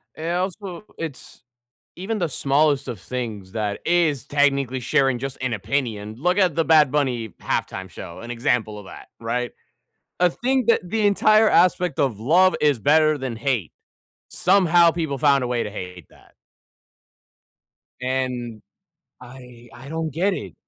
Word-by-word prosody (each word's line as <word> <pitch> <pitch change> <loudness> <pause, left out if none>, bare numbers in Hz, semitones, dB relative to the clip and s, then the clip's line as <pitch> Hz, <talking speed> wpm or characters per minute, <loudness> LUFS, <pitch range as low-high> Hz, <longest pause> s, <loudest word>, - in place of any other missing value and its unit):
And 165 +2 -4
also, 185 0 -4
it's 155 -6 -8 0.5
even 205 +5 -3
the 175 - 0
smallest 140 0 +1
of 120 -6 -5
things 110 -4 -6
that 105 -2 -2
is 165 -7 +1
technically 140 -3 +1
sharing 135 0 +1
just 135 +1 -5
an 130 -2 -1
opinion. 110 -1 -3
Look 180 +8 +1
at 185 -6 +3
the 165 - +1
Bad 155 -4 +5
Bunny 130 -6 -1
Halftime 95 0 -3
show, 85 - -9
an 120 +1 -7
example 115 -3 -1
of 100 - -12
that, - - -12
right? 120 +1 -2 0.7
I 180 - +4
think 255 +6 -1
that 230 - +4
the 215 +2 +1
entire 215 +2 +4
aspect 180 -4 +2
of 125 -7 0
love 180 +10 +4
is 145 -4 +3
better 155 +6 +3
than 130 -4 -5
hate. 115 - -2 0.6
Somehow 175 -2 +4
people 160 -5 -3
found 140 -1 +3
a - - -1
way 120 -1 -1
to - - -5
hate 90 -5 -8
that. - - -22 1.7
And 125 -4 -3 0.6
I 125 -1 -13
I 125 +3 -12
don't 160 0 -3
get 190 +5 0
it. 100 - -6
135 Hz, 155 wpm, -22 LUFS, 120-165 Hz, 1.7 s, Bad